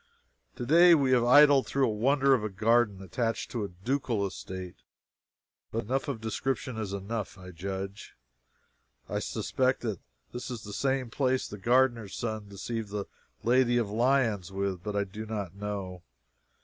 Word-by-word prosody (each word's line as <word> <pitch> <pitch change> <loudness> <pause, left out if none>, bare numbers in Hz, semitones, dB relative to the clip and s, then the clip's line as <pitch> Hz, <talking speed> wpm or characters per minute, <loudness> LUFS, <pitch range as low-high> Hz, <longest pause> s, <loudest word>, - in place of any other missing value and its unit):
Today 170 +7 +6
we 135 -4 +2
have 125 -2 +4
idled 140 +2 +6
through 135 -1 +2
a 110 - 0
wonder 135 +5 +3
of 120 -5 +2
a 110 - -1
garden 105 0 +2
attached 115 +3 -2
to 115 -4 -2
a - - -2
ducal 115 +3 -1
estate 95 -1 -7 0.9
but 115 - -2
enough 130 +6 -1
of 135 -5 -3
description 125 +3 -2
is 110 -3 -4
enough, 100 +1 -4
I 90 0 -10
judge. 95 +3 -6 0.9
I - - -2
suspect 130 0 0
that 110 -7 -3 0.3
this 120 +2 -5
was 120 -4 -6
the 105 - -8
same 130 -2 -1
place 130 0 +1
the 105 - -8
gardener's 120 -1 +2
son 110 -3 -4
deceived 110 +2 -5
the 100 -1 -3 0.4
Lady 120 0 +3
of 110 -4 0
Lyons 115 -5 +1
with, 95 -2 -2
but 105 +1 -4
I 100 - +2
do 105 +3 -8
not 100 -5 -4
know. 100 -3 -5
110 Hz, 160 wpm, -29 LUFS, 100-130 Hz, 0.9 s, Today